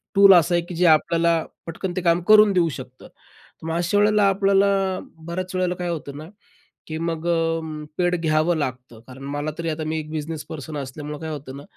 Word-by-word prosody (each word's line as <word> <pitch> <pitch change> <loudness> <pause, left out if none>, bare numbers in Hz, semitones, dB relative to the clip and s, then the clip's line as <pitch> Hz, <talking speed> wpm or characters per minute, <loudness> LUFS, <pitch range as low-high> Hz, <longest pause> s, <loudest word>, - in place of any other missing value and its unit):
Tool 200 0 +8
असा 175 -1 +4
आहे, 175 - +2
की 175 - -8
जे 180 +2 +2
आपल्याला 165 +1 +3 0.2
पटकन 175 +2 -4
ते 185 - -1
काम 170 0 +2
करून 215 -1 +7
देऊ 175 -2 +2
शकतं. 130 -3 -10
तर - - -21
मग 165 - -2
अशा 175 +4 0
वेळेला 210 0 +4
आपल्याला 195 0 +3 0.6
बऱ्याच 185 +2 -4
वेळेला 180 -1 0
काय 175 0 -4
होतं 145 -4 -5
ना, 155 - -8 0.6
की 160 0 -5
मग 165 0 -3
अ, 165 -1 +1 0.4
पेड 180 0 +2
घ्यावं 160 +1 +1
लागतं. 125 -5 -5
कारण 130 +1 -11
मला 145 +1 -2
तरी 165 0 -3
आता 155 0 -4
मी 160 0 -2
एक 155 0 -7
बिझनेस 155 0 -5
पर्सन 155 0 -7
असल्यामुळं 145 +2 -6
काय 160 - -5
होतं 140 -3 -7
ना, 140 - -9
165 Hz, 205 wpm, -22 LUFS, 155-180 Hz, 0.6 s, Tool